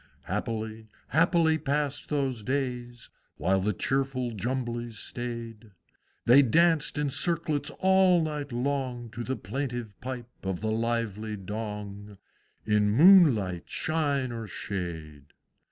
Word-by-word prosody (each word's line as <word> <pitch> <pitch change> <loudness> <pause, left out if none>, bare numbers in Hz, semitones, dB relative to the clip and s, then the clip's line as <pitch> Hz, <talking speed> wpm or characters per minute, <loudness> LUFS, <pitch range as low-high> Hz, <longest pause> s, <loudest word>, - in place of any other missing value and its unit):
_" - - -28 0.2
Happily, 110 -1 -4 0.2
happily 165 -1 +3
passed 145 -1 -1
those 135 -6 -1
days! 125 -1 -3 0.3
While 95 +2 +2
the 100 +3 +1
cheerful 135 +3 -1
Jumblies 120 +1 -3
staid; 115 -2 -6 0.6
They 125 +4 +8
danced 160 +3 +3
in 145 -2 0
circlets 155 -3 0
all 190 -2 +4
night 150 -3 -4
long, 125 -2 -2
To 120 +2 -5
the 130 +2 -2
plaintive 120 +1 -4
pipe 125 -1 -5 0.2
of 95 -2 -2
the 110 0 -1
lively 110 -2 -1
Dong, 105 0 -6 0.5
In 105 -1 +3
moonlight, 120 - +5
shine, 145 -5 0
or 115 -2 -5
shade. 80 -8 -6
120 Hz, 120 wpm, -28 LUFS, 105-140 Hz, 0.6 s, They